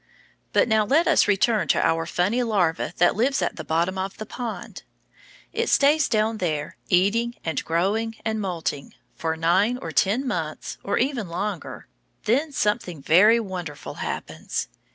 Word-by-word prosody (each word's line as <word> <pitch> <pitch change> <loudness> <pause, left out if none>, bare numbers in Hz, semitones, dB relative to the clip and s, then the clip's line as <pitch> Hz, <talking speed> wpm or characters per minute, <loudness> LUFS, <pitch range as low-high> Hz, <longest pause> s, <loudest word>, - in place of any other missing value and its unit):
But - - +3
now 220 -1 +3
let 295 +11 +3
us - - +4
return 200 -2 +2
to - - +2
our 165 0 0
funny 190 +8 +1
larva 190 -8 0
that 175 +1 +4
lives 260 +6 +1
at - - -1
the - - -5
bottom 170 +4 0
of 190 +1 -4
the 215 - -6
pond. 235 0 -6 0.7
It - - 0
stays 295 +2 +4
down 220 0 +1
there, 155 -5 -2
eating 225 +7 +2
and 160 -3 -1
growing 205 +7 0
and 220 -1 -1
moulting, 170 -7 -4 0.2
for 160 0 -3
nine 190 +9 +2
or - - -6
ten 220 +8 +2
months 160 -9 -4
or 200 - -1
even 245 -7 -1
longer; 190 0 -4 0.4
then 280 +8 +1
something 210 - -1
very 210 +10 +6
wonderful 180 -8 -6
happens. - - -4
200 Hz, 155 wpm, -24 LUFS, 170-230 Hz, 0.7 s, very